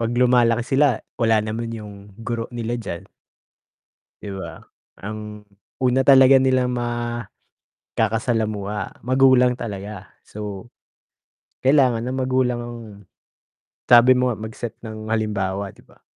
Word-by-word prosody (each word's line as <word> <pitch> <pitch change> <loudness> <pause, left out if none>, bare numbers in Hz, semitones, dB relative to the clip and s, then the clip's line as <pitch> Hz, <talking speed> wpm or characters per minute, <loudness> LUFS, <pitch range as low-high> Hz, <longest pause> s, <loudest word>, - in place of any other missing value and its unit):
'Pag 115 +1 -1
lumalaki 120 -1 +3 0.2
sila 140 -6 +3 0.2
wala 110 -2 +3
naman 115 +2 -4
yung 100 -2 -10
guro 115 -1 -3
nila 120 0 -3
diyan, 90 -6 -6 1.2
di 100 - -6
ba? 85 -4 -8 0.4
Ang 105 0 -7 0.4
una 125 +1 +3
talaga 135 -1 +8
nilang 130 -1 +2 1.0
makakasalamuha 110 -3 -2
magulang 130 -1 +4
talaga 100 -4 -7 0.2
so, 105 -2 -7 1.0
kailangan 130 -4 +3
ng 130 - -2
magulang 130 -2 0
ang 120 0 -7 1.1
sabi 125 +1 +7
mo 125 -2 +1
nga 110 - -11
mag-set 110 +1 -6
ng 110 -1 -8
halimbawa, 100 -3 -2
di - - -21
ba? - - -24
115 Hz, 115 wpm, -22 LUFS, 105-125 Hz, 1.2 s, talaga